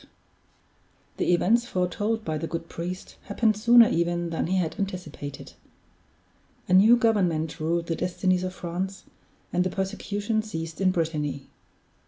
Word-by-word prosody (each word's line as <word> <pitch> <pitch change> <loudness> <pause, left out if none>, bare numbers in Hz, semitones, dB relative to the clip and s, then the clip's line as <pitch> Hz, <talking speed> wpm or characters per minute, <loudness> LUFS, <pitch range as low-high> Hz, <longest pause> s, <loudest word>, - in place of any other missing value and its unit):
The - - +1
events 230 +7 +3
foretold 205 +5 -1
by 155 -1 -2
the 165 - -3
good 165 0 -5
priest 180 +3 -6
happened 215 +1 +1
sooner 235 +2 +7
even 170 0 0
than 165 - -1
he 190 +2 +1
had 165 -4 -2
anticipated. 180 -7 -6 1.1
A 180 - +1
new 215 +6 +7
government 180 -10 +1
ruled 165 +2 0
the 165 - -2
destinies 185 +1 0
of 185 0 -4
France, 185 +3 -4 0.5
and 180 - +2
the 185 - -1
persecution 205 +3 -2
ceased 165 -5 -6
in 190 - +4
Brittany. 155 -5 -2
180 Hz, 140 wpm, -26 LUFS, 165-205 Hz, 1.1 s, sooner